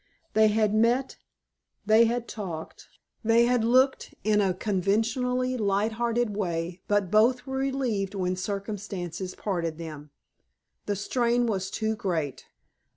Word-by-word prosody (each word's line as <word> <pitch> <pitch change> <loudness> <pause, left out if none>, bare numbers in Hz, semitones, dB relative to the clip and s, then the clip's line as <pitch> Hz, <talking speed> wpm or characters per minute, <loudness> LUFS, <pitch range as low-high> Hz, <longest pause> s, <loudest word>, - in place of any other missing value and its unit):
They 220 0 +5
had 215 -1 +2
met, 235 +4 +2 0.7
they 220 +2 +6
had 235 +1 -1
talked, 175 -7 -7 0.4
they 230 +1 +4
had 245 -1 +2
looked, 255 +3 +2
in 210 -1 +3
a 195 -2 +2
conventionally 225 +6 0
light 205 0 +1
hearted 235 -1 -1
way, 175 -2 -3
but 205 -3 +1
both 240 +4 +4
were 265 -1 -4
relieved 255 -8 -1
when 185 -1 -1
circumstances 195 -2 -5
parted 170 -6 -2
them. 155 -3 -8 0.8
The 205 - 0
strain 240 +4 +1
was 190 -4 -1
too 220 +2 -1
great. 160 - -3
215 Hz, 130 wpm, -27 LUFS, 190-235 Hz, 0.8 s, they